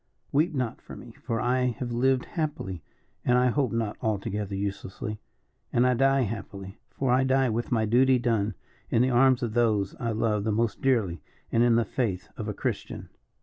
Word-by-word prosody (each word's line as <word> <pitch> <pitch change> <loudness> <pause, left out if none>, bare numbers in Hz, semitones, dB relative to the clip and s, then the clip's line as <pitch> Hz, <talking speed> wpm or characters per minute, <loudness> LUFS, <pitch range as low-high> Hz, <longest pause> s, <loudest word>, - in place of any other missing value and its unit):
Weep 155 +3 +2
not 125 -3 -2
for - - -10
me, 120 - -11
for 115 0 -4
I 125 +2 +1
have 125 -2 -4
lived 130 +2 +2
happily, 150 - -4 0.4
and 125 - +3
I 125 0 +4
hope 135 0 +1
not 115 -3 -2
altogether 105 -1 -2
uselessly, 100 +1 -4 0.5
and 120 - +3
I 125 - +4
die 135 +2 +3
happily, 100 -3 -5
for 135 -2 -1
I 130 +1 +4
die 130 -1 +2
with 115 +3 -2
my 110 -2 +2
duty 130 +4 +4
done, 110 -4 0 0.3
in 115 - +3
the 130 - +2
arms 130 +1 +4
of 115 -3 -2
those 110 -5 +2
I 115 - -1
love 110 -2 0
the 110 - 0
most 115 +1 0
dearly, 110 - +1 0.3
and 115 - +3
in 120 -1 +5
the 115 0 +3
faith 100 -6 -2
of - - -5
a - - -2
Christian." - - -4
120 Hz, 190 wpm, -27 LUFS, 105-130 Hz, 0.5 s, in